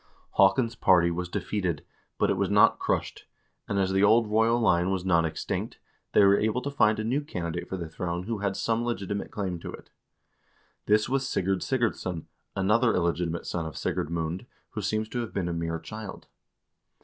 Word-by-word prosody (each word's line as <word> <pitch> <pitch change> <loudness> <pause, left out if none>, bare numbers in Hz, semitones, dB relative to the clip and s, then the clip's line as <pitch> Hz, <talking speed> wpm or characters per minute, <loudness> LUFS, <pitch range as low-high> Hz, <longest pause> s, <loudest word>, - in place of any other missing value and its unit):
Haakon's 100 +5 +4
party 85 -2 +4
was 90 +1 -3
defeated, 90 -6 -2 0.3
but - - +2
it - - +1
was 95 0 0
not 105 0 +5
crushed, - - -2 0.4
and 100 - -1
as 95 -1 +1
the 95 +1 +3
old 110 +3 +5
royal 110 +2 +3
line 90 -5 +3
was 95 -1 -1
not 85 -3 +3
extinct, 80 - -3 0.4
they 105 - +6
were 100 +1 +5
able 110 +3 +1
to 140 - -3
find 110 -6 +3
a 110 - -2
new 125 +6 0
candidate 85 - -4
for 95 - -3
the 85 -2 -5
throne 85 +1 -4
who 110 +1 -3
had 100 -1 -1
some 115 0 0
legitimate 100 -4 -3
claim 95 -4 -3
to - - -7
it. - - -12 1.0
This 105 0 +4
was 135 0 0
Sigurd 95 -3 0
Sigurdsson, 110 -9 -1 0.3
another 105 +5 +3
illegitimate 85 -1 -1
son 85 -2 -3
of 80 - -8
Sigurd 75 - -2
Mund, 85 +5 -3 0.2
who 105 - -4
seems 110 +2 -1
to 120 - -3
have 115 -2 -4
been 95 -3 0
a 85 - -2
mere 85 0 -2
child. 110 +3 -8
100 Hz, 190 wpm, -27 LUFS, 85-110 Hz, 1.0 s, they